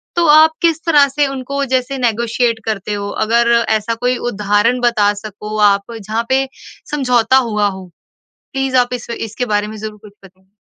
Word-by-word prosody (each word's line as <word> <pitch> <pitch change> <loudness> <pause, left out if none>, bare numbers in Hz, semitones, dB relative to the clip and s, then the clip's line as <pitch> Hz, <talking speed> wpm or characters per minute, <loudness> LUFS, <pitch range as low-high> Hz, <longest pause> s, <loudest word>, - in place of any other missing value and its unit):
तो 345 - +2
आप 315 +1 +7
किस 330 -1 +1
तरह 295 -4 +5
से 280 +1 0
उनको 275 +1 -4
जैसे 260 +2 -2
नेगोशिएट 235 -1 0
करते 210 -1 -3
हो? 200 0 -4
अगर 235 +2 +2 0.2
ऐसा 220 +1 0
कोई 245 +2 -1
उदाहरण 205 +4 +1
बता 215 -4 +2
सको 210 +1 -7
आप 200 +3 -3
जहाँ 220 +3 -3
पे 265 +1 +2 0.4
समझौता 250 -3 +2
हुआ 210 -1 +1
हो। 190 -2 -9 0.6
प्लीज़ 270 -1 -1
आप 245 0 +2
इस 245 -1 -6
इसके 230 +1 -4
बारे 205 0 0
में 215 0 -8
ज़रूर 215 0 -7
कुछ 205 - -14
बताइए। 190 0 -21
235 Hz, 175 wpm, -16 LUFS, 210-260 Hz, 0.6 s, आप